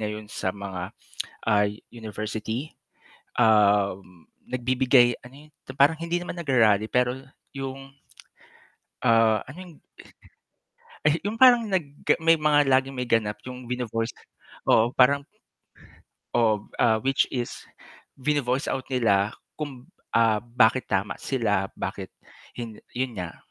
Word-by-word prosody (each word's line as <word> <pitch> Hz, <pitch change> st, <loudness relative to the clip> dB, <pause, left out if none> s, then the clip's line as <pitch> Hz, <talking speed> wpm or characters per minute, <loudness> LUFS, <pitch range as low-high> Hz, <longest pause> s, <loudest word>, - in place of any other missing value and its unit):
ngayon 105 Hz, 0 st, -4 dB
sa 95 Hz, -, -2 dB
mga 95 Hz, -1 st, -6 dB, 0.6 s
ay 105 Hz, 0 st, +1 dB
university, 110 Hz, +4 st, -5 dB, 0.7 s
um, 100 Hz, -5 st, +2 dB, 0.2 s
nagbibigay 125 Hz, 0 st, +3 dB
ano 140 Hz, +4 st, -14 dB
yun? -, -, -36 dB, 0.3 s
Parang 145 Hz, +4 st, +5 dB
hindi 170 Hz, +1 st, -1 dB
naman 175 Hz, 0 st, -6 dB
nag-ra-rally, 110 Hz, -9 st, +3 dB
pero 125 Hz, +1 st, +1 dB, 0.4 s
yung 135 Hz, 0 st, -6 dB, 1.1 s
Ah, 115 Hz, -3 st, +4 dB
ano 145 Hz, +7 st, -10 dB
yung 175 Hz, -3 st, -13 dB, 1.3 s
Ayu 155 Hz, +1 st, +3 dB
yung 210 Hz, -, -2 dB
parang 245 Hz, -3 st, +7 dB
nag 190 Hz, -4 st, +1 dB, 0.4 s
may 165 Hz, 0 st, +5 dB
mga 150 Hz, -1 st, +4 dB
laging 135 Hz, +1 st, +2 dB
may 125 Hz, -1 st, -3 dB
ganap 105 Hz, -2 st, 0 dB
yung 125 Hz, -1 st, -9 dB
vino-voice 120 Hz, -2 st, -3 dB, 0.6 s
oo 115 Hz, +2 st, +4 dB
parang 140 Hz, +2 st, +4 dB, 1.1 s
Oh, 110 Hz, -3 st, +2 dB, 0.2 s
ah, 115 Hz, -2 st, +4 dB
which 135 Hz, +4 st, +1 dB
is 120 Hz, -2 st, -4 dB, 0.6 s
vino-voice 135 Hz, -1 st, 0 dB
out 130 Hz, -1 st, -4 dB
nila 110 Hz, -5 st, +1 dB, 0.2 s
kung, 135 Hz, -5 st, -7 dB, 0.3 s
ah, 115 Hz, -2 st, +3 dB
bakit 120 Hz, +1 st, +2 dB
tama 100 Hz, +1 st, 0 dB
sila, 105 Hz, -7 st, 0 dB
bakit -, -, -5 dB, 0.5 s
hin 115 Hz, -3 st, -7 dB, 0.2 s
yun 130 Hz, 0 st, -1 dB
nga. 85 Hz, -1 st, -6 dB
120 Hz, 120 wpm, -25 LUFS, 110-135 Hz, 1.3 s, parang